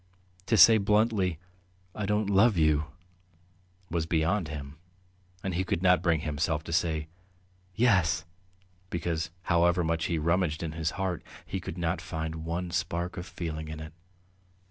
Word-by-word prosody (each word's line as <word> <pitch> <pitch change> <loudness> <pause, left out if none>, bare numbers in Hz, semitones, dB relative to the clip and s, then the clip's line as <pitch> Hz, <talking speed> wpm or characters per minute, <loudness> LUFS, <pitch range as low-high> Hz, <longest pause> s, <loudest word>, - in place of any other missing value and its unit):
To 115 - +3
say 110 +1 +9
bluntly, 105 -4 +2 0.6
"I 105 -2 -3
don't 105 0 +1
love 100 +1 +4
you," 75 -1 +3 1.1
was 85 -1 -1
beyond 85 +3 +1
him, 70 -1 -7 0.7
and 95 - -2
he 90 +2 0
could 90 -1 -2
not 90 0 +5
bring 80 -3 +2
himself 75 0 -1
to 85 - -6
say 80 -2 0 0.7
"Yes," 90 -8 +3 0.6
because 85 -2 -2
however 85 +1 +3
much 80 0 0
he 85 - 0
rummaged 85 0 0
in 80 - -3
his 80 0 -1
heart 95 -3 -2 0.2
he 95 - -4
could 85 -1 -7
not 85 +1 -1
find 80 0 -5
one 85 +2 -3
spark 85 +1 -2
of 90 0 -6
feeling 80 -2 -5
in 80 0 -6
it. 80 0 -8
85 Hz, 150 wpm, -29 LUFS, 80-95 Hz, 1.1 s, say